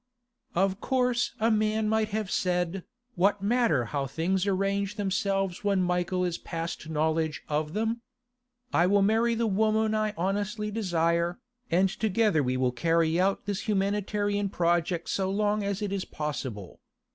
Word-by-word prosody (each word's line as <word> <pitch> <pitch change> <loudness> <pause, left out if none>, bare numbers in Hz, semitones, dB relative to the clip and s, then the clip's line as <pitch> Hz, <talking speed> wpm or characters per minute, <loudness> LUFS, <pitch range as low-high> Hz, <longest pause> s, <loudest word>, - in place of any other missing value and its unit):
Of 190 +2 +1
course 250 -1 +1
a 225 +2 +3
man 215 0 +1
might 220 0 +2
have 215 -2 -3
said, 180 0 0 0.3
'What 200 +2 +2
matter 210 - +2
how 140 +2 -2
things 180 +7 0
arrange 200 +1 0
themselves 195 -2 -1
when 200 -2 +2
Michael 180 +1 0
is 175 -1 -2
past 165 -1 -5
knowledge 160 0 0
of 150 +1 -1
them? 225 +3 -1 0.7
I 175 - +4
will 200 +1 +4
marry 225 +3 +3
the 230 +1 0
woman 220 +1 +2
I 215 -1 0
honestly 205 +4 -1
desire, 170 -4 0 0.3
and 185 +3 +4
together 215 -4 +1
we 130 -1 0
will 130 -1 +1
carry 165 +5 +1
out 195 +2 +1
this 205 +2 -3
humanitarian 205 0 0
project 170 -1 0
so 190 -1 0
long 210 +1 +1
as 200 +1 -2
it 205 - -1
be 200 -1 -1
possible. 130 - -5
195 Hz, 150 wpm, -28 LUFS, 170-210 Hz, 0.7 s, I